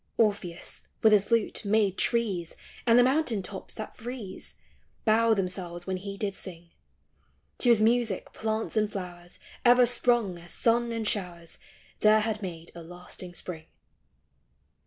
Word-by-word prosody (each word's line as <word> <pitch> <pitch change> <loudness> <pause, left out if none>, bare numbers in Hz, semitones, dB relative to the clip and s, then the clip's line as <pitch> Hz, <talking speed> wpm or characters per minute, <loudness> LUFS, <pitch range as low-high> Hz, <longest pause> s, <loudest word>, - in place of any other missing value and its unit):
1. 225 - +5
Orpheus, 190 -5 -4 0.2
with 220 -1 +7
his 205 -1 +4
lute, 230 -2 +1
made 205 -2 +2
trees, 200 -9 0 0.3
And 230 0 +6
the 245 - +7
mountain 255 -6 +1
tops 190 +1 -7
that 215 - -7
freeze, 230 -5 -8 0.5
Bow 225 0 +4
themselves 180 -2 -4
when 190 -1 -2
he 200 +1 -7
did 200 -1 -2
sing; 170 -3 -9 0.9
To 245 - +5
his 225 -2 +6
music 230 -3 +1
plants 220 +1 -2
and 215 -1 +1
flowers 175 -3 -7 0.3
Ever 245 0 +7
sprung, 240 -6 +1
as 175 +1 -11
sun 235 0 +2
and 225 -2 -2
showers 175 -5 -2 0.4
There 215 0 +5
had 215 -1 -2
made 170 -3 -7
a 170 - -9
lasting 175 +1 -10
Spring. 160 -3 -6
205 Hz, 150 wpm, -28 LUFS, 180-230 Hz, 0.9 s, with